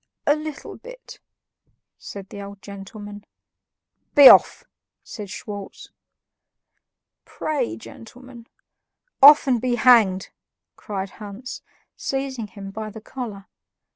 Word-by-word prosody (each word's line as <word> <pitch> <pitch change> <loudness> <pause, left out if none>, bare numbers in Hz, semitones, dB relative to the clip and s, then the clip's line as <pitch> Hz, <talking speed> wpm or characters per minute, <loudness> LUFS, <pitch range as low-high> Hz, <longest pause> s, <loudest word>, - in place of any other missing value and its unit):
"A 290 - +4
little 305 -1 -8
bit," - - -13 0.8
said 200 -1 -10
the 200 - -9
old 200 0 -11
gentleman. 205 +1 -10 0.9
"Be 285 -2 +11
off!" - - +5 0.4
said 210 -3 -9
Schwartz. 200 0 -9 1.3
"Pray, 200 - -3
gentlemen." 240 - -13 0.7
"Off, 290 +2 +9
and 250 -4 +1
be 250 -1 0
hanged!" 220 -7 +4 0.5
cried 195 -2 -6
Hans, 210 +5 -8 0.3
seizing 270 -4 -4
him 195 -1 -10
by 215 +1 -6
the 220 - -10
collar. 215 -4 -8
220 Hz, 105 wpm, -22 LUFS, 200-260 Hz, 1.3 s, Be